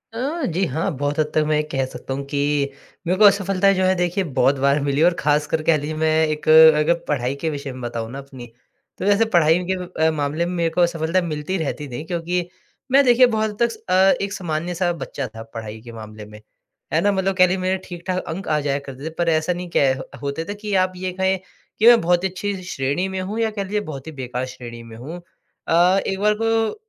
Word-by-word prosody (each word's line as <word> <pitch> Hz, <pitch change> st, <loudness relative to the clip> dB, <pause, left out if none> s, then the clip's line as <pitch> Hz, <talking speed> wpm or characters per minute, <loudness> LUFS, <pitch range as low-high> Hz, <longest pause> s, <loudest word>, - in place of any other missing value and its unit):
अ, 280 Hz, +6 st, -2 dB
जी 180 Hz, 0 st, -1 dB
हाँ। 160 Hz, +7 st, -1 dB
बहुत 145 Hz, +2 st, -2 dB
हद 155 Hz, -, +3 dB
तक 155 Hz, -, +3 dB
मैं 155 Hz, -, +2 dB
ये -, -, +2 dB
कह 135 Hz, -1 st, 0 dB
सकता 135 Hz, -, -6 dB
हूँ 140 Hz, +1 st, -4 dB
कि 145 Hz, -, -1 dB, 0.7 s
मेरे 180 Hz, +2 st, +1 dB
को -, -, +6 dB
असफलता 195 Hz, -1 st, +4 dB
जो 185 Hz, -1 st, 0 dB
है 185 Hz, -, +4 dB
देखिए 180 Hz, +2 st, 0 dB, 0.2 s
बहुत 140 Hz, -, +4 dB
बार 140 Hz, +2 st, +3 dB
मिली 140 Hz, 0 st, 0 dB
है। -, -, +6 dB
और 175 Hz, -, +4 dB
खासकर 150 Hz, +1 st, +1 dB
कह 160 Hz, -, +5 dB
ली 150 Hz, +2 st, -4 dB
मैं 160 Hz, 0 st, +3 dB, 0.2 s
एक 150 Hz, -1 st, -4 dB
अगर 160 Hz, 0 st, +7 dB
पढ़ाई 130 Hz, -2 st, -1 dB
के 160 Hz, -, +1 dB
विषय 140 Hz, -2 st, -5 dB
में 130 Hz, -, -9 dB
बताऊँ 115 Hz, -1 st, -4 dB
ना 135 Hz, -, -6 dB
अपनी, 135 Hz, -3 st, -10 dB, 0.5 s
तो -, -, -4 dB
वैसे 205 Hz, +2 st, +4 dB
पढ़ाई 165 Hz, 0 st, +5 dB
के -, -, +2 dB, 0.3 s
अ, 160 Hz, -, +4 dB
मामले 150 Hz, +2 st, -1 dB
में 175 Hz, -, -3 dB
मेरे 170 Hz, -1 st, +1 dB
को 165 Hz, +2 st, 0 dB
असफलता 170 Hz, +1 st, +1 dB
मिलती 165 Hz, +2 st, -3 dB
रहती 150 Hz, -2 st, -3 dB
थी। 120 Hz, +5 st, -5 dB
क्योंकि 175 Hz, +1 st, -2 dB, 0.4 s
मैं 275 Hz, +2 st, +6 dB
देखिए 250 Hz, 0 st, +6 dB
बहुत 220 Hz, -2 st, 0 dB
हद 210 Hz, -, -8 dB
तक 230 Hz, -1 st, -8 dB
अ, 190 Hz, +1 st, +5 dB
एक 200 Hz, 0 st, -3 dB
सामान्य-सा 175 Hz, 0 st, -2 dB
बच्चा 135 Hz, -1 st, -4 dB
था 110 Hz, -, -7 dB
पढ़ाई 110 Hz, -1 st, -7 dB
के 120 Hz, +1 st, -11 dB
मामले 110 Hz, -1 st, -10 dB
में, 105 Hz, 0 st, -13 dB, 0.5 s
है 160 Hz, -, +3 dB
ना। 205 Hz, -, +3 dB
मतलब 190 Hz, 0 st, 0 dB
कह 185 Hz, -1 st, +6 dB
ली 185 Hz, +1 st, 0 dB
मेरे 185 Hz, 0 st, 0 dB
ठीक-ठाक 180 Hz, +1 st, -4 dB
अंक 180 Hz, +5 st, -5 dB
आ 150 Hz, -1 st, +1 dB
जाया 140 Hz, -1 st, -1 dB
करते 135 Hz, +2 st, -9 dB
थे। -, -, -2 dB
पर 170 Hz, -1 st, +1 dB
ऐसा 160 Hz, +2 st, +1 dB
नहीं 175 Hz, 0 st, -6 dB
कै 135 Hz, -2 st, +4 dB
ह 130 Hz, -, -6 dB, 0.2 s
होते 140 Hz, +3 st, -3 dB
थे 205 Hz, -, -4 dB
कि 210 Hz, 0 st, -6 dB
आप 185 Hz, -, -8 dB
ये 185 Hz, 0 st, -4 dB
कहें 190 Hz, +1 st, 0 dB, 0.4 s
कि 220 Hz, -, +5 dB
मैं 240 Hz, -1 st, +8 dB
बहुत 175 Hz, +1 st, +2 dB
ही 190 Hz, -, +1 dB
अच्छी 200 Hz, +2 st, -3 dB
श्रेणी 145 Hz, +2 st, -2 dB
में 190 Hz, 0 st, -4 dB
हूँ 205 Hz, +4 st, -4 dB
या 225 Hz, -1 st, +1 dB
कह 205 Hz, -2 st, -3 dB
लीजिए 205 Hz, +2 st, -2 dB
बहुत 135 Hz, 0 st, -8 dB
ही -, -, -5 dB
बेकार 125 Hz, 0 st, -3 dB
श्रेणी 120 Hz, -2 st, -9 dB
में 115 Hz, -1 st, -12 dB
हूँ। 155 Hz, +9 st, -8 dB, 0.5 s
अ, 175 Hz, +3 st, +4 dB
एक 195 Hz, 0 st, -2 dB
बार 210 Hz, +1 st, +3 dB
ब 225 Hz, -1 st, +1 dB
165 Hz, 240 wpm, -21 LUFS, 145-190 Hz, 0.7 s, मैं